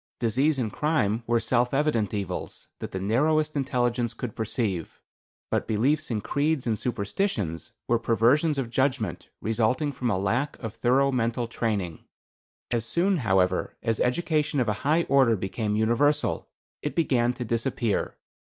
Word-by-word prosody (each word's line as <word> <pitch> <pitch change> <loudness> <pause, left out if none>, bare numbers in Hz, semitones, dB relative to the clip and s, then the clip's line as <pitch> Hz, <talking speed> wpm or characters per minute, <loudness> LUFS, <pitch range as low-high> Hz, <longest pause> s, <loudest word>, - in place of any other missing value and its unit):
Disease 135 +6 +2
and 115 -5 -2
crime 120 -8 +1
were 120 0 +3
self 125 +2 +1
evident 135 -8 +1
evils, 100 -4 -5
that - - -5
the 95 - -3
narrowest 150 +10 +1
intelligence 125 -4 0
could 120 -4 -5
perceive; 110 -6 -2 0.5
but - - 0
beliefs 140 +9 +1
in 110 -3 -1
creeds 145 +2 0
and 115 -2 +1
superstitions 100 - -2
were 120 -1 +2
perversions 125 +7 +3
of 125 -4 -2
judgment, 130 -3 -1
resulting 115 +7 +1
from 125 -3 -2
a 95 - +1
lack 120 +10 -1
of 115 -4 -6
thorough 130 +4 +2
mental 120 -1 0
training. 105 -8 -2 0.7
As 120 -2 +1
soon, 175 +10 +1
however, 95 - +1
as 115 -2 0
education 150 +2 +1
of 125 - +1
a 105 - +2
high 155 +5 +3
order 135 -6 +4
became 105 +2 -2
universal, 130 +7 +1 0.3
it 150 - -3
began 125 -7 +2
to 125 0 -5
disappear. 115 -1 -1
120 Hz, 150 wpm, -26 LUFS, 110-140 Hz, 0.7 s, order